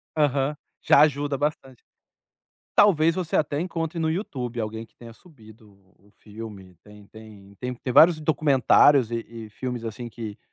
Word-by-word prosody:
Aham. 145 -1 +1 0.3
Já - - +6
ajuda 145 -1 +1
bastante. 135 -4 -4 0.9
Talvez 165 -5 +4
você 180 -4 -3
até 150 -1 0
encontre 165 -1 -4
no 160 -1 0
YouTube 130 - -4
alguém 110 +1 -5
que - - -35
tenha 115 -1 -13
subido 110 - -19
o 95 +1 -28
o - - -26
filme. 105 -5 -12
Tem 105 -1 -16
tem 105 -3 -15
tem 125 0 -4
tem 125 +1 -5
vários 165 -1 +6
documentários 145 -4 +3
e 115 - -1
e 115 -2 -10
filmes, 125 +1 -6
assim, 120 +2 -6
que 110 -2 -8
125 Hz, 160 wpm, -24 LUFS, 110-150 Hz, 0.9 s, Já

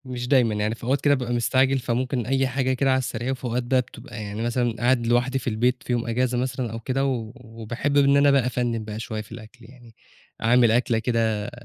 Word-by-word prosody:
مش 125 -1 -5
دايمًا، 125 -5 +3
يعني 105 +2 -1
في - - -17
أوقات 135 +3 0
كده 145 - +4
بابقى 125 -2 -3
مستعجل، 130 +3 +2
فممكن 125 0 -2
أي 135 +2 +1
حاجة 130 0 0
كده 135 +1 +1
على 130 - +3
السريع. 125 0 -2
في 130 - -10
أوقات 125 0 -1
بقى 130 +1 +2
بتبقى 115 - -10
يعني 105 +1 -5
مثلًا، 120 0 0
قاعد 120 -1 +2
لوحدي 125 +3 +1
في - - -9
البيت 125 +4 0
في 125 - -2
يوم 120 -1 -1
إجازة 125 +1 0
مثلًا 125 -1 -2
أو 115 - -5
كده، 130 +4 -1
و 120 -5 -2
وباحب 120 +3 -4
إن 140 0 +5
أنا 140 0 +5
بقى 135 -3 +3
أفنِّن 120 -2 -1
بقى 105 0 -6
شوية 110 -1 -4
في 105 - -15
الأكل 115 +2 -12
يعني. 120 -2 -17 0.5
أعمل 120 0 +4
أكلة 120 -1 +2
كده 110 -3 -1
125 Hz, 225 wpm, -24 LUFS, 115-130 Hz, 0.5 s, إن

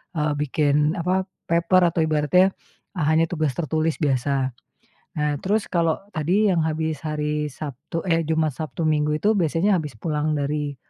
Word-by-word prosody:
eee, 150 -1 +1
bikin, 150 +1 +1
apa, 185 +2 +1 0.3
paper 170 +2 +4
atau 165 - -2
ibaratnya 160 +5 +3 0.4
hanya 160 0 +2
tugas 155 -5 0
tertulis 160 -1 -1
biasa. 135 -1 +1 0.7
Nah, 150 0 +1
terus 205 +2 0
kalau 165 -2 +2 0.2
tadi 180 +8 +1
yang 170 - +2
habis 160 -1 -2
hari 150 0 -1
Sabtu 145 +3 -6
eh, 165 -1 +3
Jumat, 160 -1 +1
Sabtu, 160 +1 -4
Minggu, 150 -1 +1
itu 210 +7 +3
biasanya 180 +2 +2
habis 150 -7 -6
pulang 150 +4 -1
dari 145 0 -2
155 Hz, 150 wpm, -23 LUFS, 150-165 Hz, 0.7 s, paper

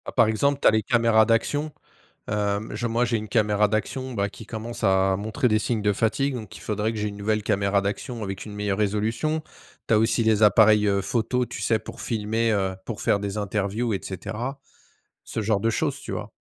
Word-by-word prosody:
Par - - +5
exemple, 140 +6 +1
tu - - +5
as - - +7
les 110 0 +2
caméras 115 -1 +4
d'action. 145 +7 +1 0.6
Hem. 105 0 -1
Je 115 +3 -2
moi, 115 +1 +1
j'ai 115 0 0
une 110 -1 -5
caméra 105 -2 +2
d'action 130 +5 -2
bah 100 -3 -1
qui 110 - -11
commence 115 +1 -6
à 95 -1 +3
montrer 110 +6 0
des 110 -1 +3
signes 110 0 -1
de 105 0 +2
fatigue, 120 +7 0
donc 110 -5 -7
il - - -12
faudrait 105 +1 -1
que 110 - -5
j'ai 105 0 -1
une 100 - -8
nouvelle 105 +1 0
caméra 100 -1 +1
d'action 110 +4 -4
avec 95 -1 -5
une 105 - -9
meilleure 105 -1 -2
résolution. 110 +10 0 0.5
Tu - - +4
as - - +5
aussi 115 +2 +2
les 110 -1 +2
appareils, 105 0 +6
heu, 100 -1 +2
photos, 120 +5 0
tu - - -6
sais, 110 - +2
pour - - -10
filmer, 110 +1 0
heu, 95 -2 0
pour 115 - -5
faire 100 - +2
des 100 0 -4
interviews 105 +3 -1
et 95 - -2
cetera. 120 +8 -5 0.7
Ce 110 - -3
genre 105 -1 +1
de 115 +3 +1
choses, 115 - -1
tu - - -8
vois? - - -5
110 Hz, 220 wpm, -25 LUFS, 105-115 Hz, 0.7 s, as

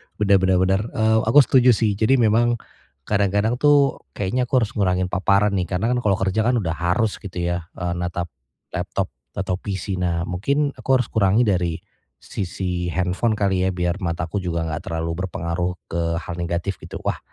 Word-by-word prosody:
Bener 100 -2 +3
bener 95 0 +2
bener, 95 +2 +2
eee, 110 0 +3
aku 145 +5 +7
setuju 125 -2 +5
sih. 105 -2 0
Jadi 115 +4 +4
memang 120 0 +3 0.5
kadang-kadang 105 - +1
tuh 145 -1 +4 0.2
kayaknya 125 +6 -1
aku 125 -1 +3
harus 105 - -3
ngurangin 90 -2 0
paparan 100 +3 +2
nih. 95 -3 -1
Karena 95 +8 -1
kan 125 - +1
kalau 105 -5 +2
kerja 95 +4 0
kan 125 - +3
udah 95 -8 0
harus 90 +5 0
gitu 90 -3 -5
ya, 85 -1 -2
eee, 90 -1 -3
natap 90 -1 -3 0.4
laptop - - -3 0.2
atau 95 -2 -2
PC. 95 -1 -4
Nah 85 -1 0
mungkin 140 +12 0
aku 135 - +2
harus 125 -3 0
kurangi 105 +2 +3
dari 90 -6 +1 0.4
sisi 90 -2 -4
handphone 95 +6 0
kali 95 -3 +1
ya, - - +2
biar 90 +2 -1
mataku 85 +2 -2
juga 85 -2 -2
enggak 80 -2 -5
terlalu 80 0 -2
berpengaruh 85 +1 -3
ke 85 - -3 0.2
hal 85 +1 -5
negatif 85 +3 -2
gitu. - - -7
Wah - - -1
95 Hz, 180 wpm, -22 LUFS, 90-110 Hz, 0.5 s, aku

